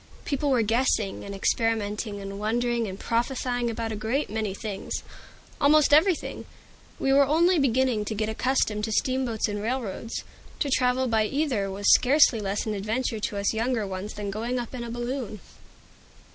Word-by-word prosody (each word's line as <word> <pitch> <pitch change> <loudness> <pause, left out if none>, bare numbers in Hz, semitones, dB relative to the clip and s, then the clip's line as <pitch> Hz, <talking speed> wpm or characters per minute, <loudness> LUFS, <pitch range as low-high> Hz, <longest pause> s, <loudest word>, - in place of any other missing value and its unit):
People 285 0 -1
were 250 -4 +3
guessing 225 -3 +1
and 200 0 -6
experimenting 210 0 -1
and 195 0 -6
wondering 235 +2 0
and 190 0 -7
prophesying 245 0 -1
about 230 0 -3
a - - -3
great 225 +5 -1
many 215 -2 -1
things, 205 -3 -4 0.6
about - - -23
almost 295 0 +5
everything. 330 +3 +2 0.5
We 270 - +1
were 280 0 +5
only 335 +4 +4
beginning 255 -4 +2
to 215 - -3
get 215 +1 -1
accustomed 220 -2 0
to 220 - -4
steamboats 255 -1 0
and 205 -1 -3
railroads. 230 -1 -3 0.3
To 285 - -1
travel 255 0 +2
by 220 -2 +2
either 260 -7 -1
was 200 +1 -5
scarcely 270 -3 +5
less 200 0 -2
an 215 - -2
adventure 220 +3 -2
to 205 0 -3
us 200 +2 0
younger 225 0 0
ones 195 +2 -5
than 205 -1 -4
going 230 +5 -2
up 240 0 -5
in 250 -2 -5
a 235 - -6
balloon. 240 -2 -4
230 Hz, 170 wpm, -26 LUFS, 210-260 Hz, 0.6 s, almost